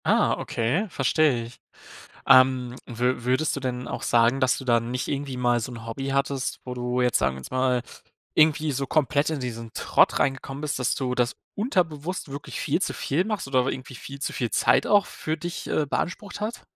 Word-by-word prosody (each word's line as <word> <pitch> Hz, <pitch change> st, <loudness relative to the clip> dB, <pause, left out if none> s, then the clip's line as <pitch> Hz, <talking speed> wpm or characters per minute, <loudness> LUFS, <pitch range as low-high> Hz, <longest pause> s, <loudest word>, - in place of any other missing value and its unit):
Ah -, -, +3 dB
okay, 135 Hz, -, -1 dB
verstehe 135 Hz, -4 st, +2 dB
ich. 120 Hz, +2 st, -12 dB, 0.7 s
Ähm, 130 Hz, -1 st, +5 dB
wü 120 Hz, +1 st, -1 dB
würdest 130 Hz, +6 st, +1 dB
du -, -, -3 dB
denn 125 Hz, -1 st, -3 dB
auch -, -, -5 dB
sagen, 120 Hz, +3 st, +3 dB
dass 130 Hz, -3 st, +2 dB
du 130 Hz, -, -8 dB
da 120 Hz, -1 st, +4 dB
nicht 120 Hz, +2 st, -3 dB
irgendwie 140 Hz, -2 st, -3 dB
mal 120 Hz, -1 st, +2 dB
so 120 Hz, +3 st, -5 dB
'n 115 Hz, -1 st, -9 dB
Hobby 135 Hz, +4 st, -4 dB
hattest, 135 Hz, -1 st, -1 dB
wo 125 Hz, -, -4 dB
du 125 Hz, 0 st, -1 dB
jetzt- 125 Hz, -2 st, +3 dB
sagen 65 Hz, 0 st, 0 dB
wir -, -, -8 dB
jetzt -, -, -10 dB
mal- 130 Hz, -1 st, +1 dB, 0.5 s
irgendwie 155 Hz, -1 st, +4 dB
so 135 Hz, +1 st, -2 dB
komplett 145 Hz, +1 st, +1 dB
in 155 Hz, -3 st, -2 dB
diesen 115 Hz, -2 st, -5 dB
Trott -, -, +3 dB
reingekommen 135 Hz, +1 st, -1 dB
bist, 150 Hz, -1 st, -2 dB
dass 125 Hz, -, +1 dB
du 125 Hz, -2 st, -2 dB
das 125 Hz, 0 st, +1 dB, 0.2 s
unterbewusst 180 Hz, -, -1 dB
wirklich 140 Hz, +1 st, -6 dB
viel -, -, 0 dB
zu -, -, 0 dB
viel 165 Hz, +7 st, 0 dB
machst 210 Hz, -8 st, -3 dB
oder 130 Hz, -2 st, +2 dB
irgendwie 130 Hz, 0 st, -5 dB
viel 135 Hz, +4 st, -9 dB
zu -, -, -3 dB
viel 120 Hz, -3 st, -1 dB
Zeit -, -, +3 dB
auch 205 Hz, -2 st, +4 dB
für 155 Hz, +1 st, -4 dB
dich, 175 Hz, +2 st, -5 dB
äh, 150 Hz, -, +1 dB
beansprucht 200 Hz, +7 st, -3 dB
hat? 230 Hz, +3 st, -3 dB
130 Hz, 205 wpm, -25 LUFS, 125-150 Hz, 0.7 s, Ähm